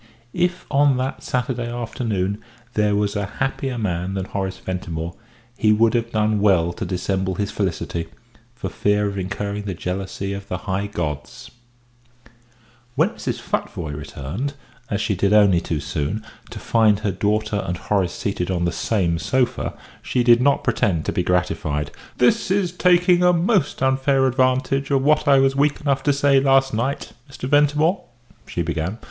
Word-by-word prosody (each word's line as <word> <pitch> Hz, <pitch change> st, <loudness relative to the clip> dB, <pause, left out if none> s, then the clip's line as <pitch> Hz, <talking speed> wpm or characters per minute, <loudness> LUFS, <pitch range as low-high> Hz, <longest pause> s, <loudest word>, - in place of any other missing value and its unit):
If 180 Hz, 0 st, 0 dB
on 140 Hz, -2 st, +4 dB
that 130 Hz, +1 st, -3 dB
Saturday 125 Hz, -1 st, -2 dB
afternoon 110 Hz, -4 st, -2 dB, 0.3 s
there 105 Hz, -1 st, +2 dB
was 105 Hz, 0 st, 0 dB
a 100 Hz, -1 st, -1 dB
happier 135 Hz, -1 st, -2 dB
man 95 Hz, -3 st, -2 dB
than 95 Hz, -1 st, -2 dB
Horace 95 Hz, -1 st, -3 dB
Ventimore, 85 Hz, -2 st, -4 dB, 0.5 s
he 110 Hz, -, +4 dB
would 110 Hz, +1 st, +4 dB
have 115 Hz, -1 st, 0 dB
done 110 Hz, -1 st, +1 dB
well 90 Hz, -4 st, +3 dB
to -, -, -5 dB
dissemble 95 Hz, 0 st, -1 dB
his 100 Hz, +2 st, -2 dB
felicity, 85 Hz, -3 st, -2 dB, 0.5 s
for 125 Hz, -, -5 dB
fear 105 Hz, 0 st, +1 dB
of 100 Hz, -1 st, -2 dB
incurring 100 Hz, +2 st, -3 dB
the 95 Hz, -3 st, -3 dB
jealousy 95 Hz, +2 st, -4 dB
of 100 Hz, 0 st, -7 dB
the 90 Hz, -, -3 dB
high 100 Hz, +2 st, -2 dB
gods. 85 Hz, -, -5 dB, 1.4 s
When 160 Hz, +8 st, +3 dB
Mrs. 230 Hz, -, -4 dB
Futvoye 80 Hz, -4 st, -3 dB
returned, 75 Hz, -, -5 dB, 0.3 s
as 105 Hz, -1 st, -1 dB
she -, -, 0 dB
did 100 Hz, +2 st, +1 dB
only 100 Hz, -5 st, +5 dB
too 80 Hz, -, -2 dB
soon, 75 Hz, +9 st, -3 dB, 0.2 s
to -, -, -8 dB
find 110 Hz, -3 st, +3 dB
her 105 Hz, -2 st, 0 dB
daughter 105 Hz, +2 st, 0 dB
and 90 Hz, +1 st, -3 dB
Horace 95 Hz, -3 st, 0 dB
seated 95 Hz, -3 st, -2 dB
on 85 Hz, -2 st, 0 dB
the 85 Hz, -, +1 dB
same 85 Hz, -2 st, 0 dB
sofa, 130 Hz, +5 st, 0 dB, 0.3 s
she 125 Hz, -, 0 dB
did 120 Hz, 0 st, +6 dB
not 140 Hz, +2 st, +3 dB
pretend 105 Hz, -, +1 dB
to -, -, 0 dB
be -, -, 0 dB
gratified. 75 Hz, -5 st, -1 dB, 0.3 s
"This 125 Hz, +6 st, +3 dB
is 190 Hz, -2 st, +1 dB
taking 180 Hz, 0 st, +4 dB
a 180 Hz, 0 st, +5 dB
most 175 Hz, -, +1 dB
unfair 135 Hz, 0 st, +2 dB
advantage 130 Hz, +1 st, +1 dB
of 135 Hz, -2 st, +2 dB
what 150 Hz, +1 st, +3 dB
I 140 Hz, -1 st, +6 dB
was 135 Hz, 0 st, +3 dB
weak 145 Hz, +1 st, +2 dB
enough 140 Hz, -2 st, 0 dB
to 145 Hz, -, +4 dB
say 140 Hz, -1 st, +4 dB
last 135 Hz, -1 st, +3 dB
night, 125 Hz, +6 st, -2 dB, 0.2 s
Mr. 130 Hz, -1 st, -6 dB
Ventimore," 150 Hz, +5 st, +3 dB, 0.4 s
she 85 Hz, -, -2 dB
began. 85 Hz, +5 st, -2 dB
105 Hz, 165 wpm, -22 LUFS, 95-135 Hz, 1.4 s, did